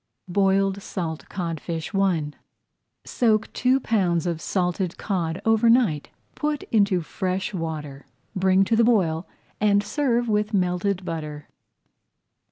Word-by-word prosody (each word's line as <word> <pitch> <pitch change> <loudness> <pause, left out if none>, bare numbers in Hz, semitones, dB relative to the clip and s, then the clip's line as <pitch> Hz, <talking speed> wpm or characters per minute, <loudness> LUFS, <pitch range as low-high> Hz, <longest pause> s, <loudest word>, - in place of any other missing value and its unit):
BOILED 195 +1 +2
SALT 165 -5 -5
CODFISH 165 -2 -4
I 180 -7 +1 0.7
Soak 220 -3 +1
two 255 +2 +2
pounds 185 -8 +1
of 170 -2 -2
salted 180 -1 -1
cod 175 -5 -2
over 225 +1 +4
night, 225 - +3 0.2
put 300 -1 -2
into 200 -5 +3
fresh 185 +4 -3
water, 150 -6 -5 0.3
bring 190 0 +4
to 225 +4 +1
the 230 - +4
boil 185 -8 +2 0.3
and 205 -1 +3
serve 240 +1 0
with 210 -1 0
melted 185 +1 0
butter. 150 -3 -5
190 Hz, 120 wpm, -24 LUFS, 170-210 Hz, 0.7 s, over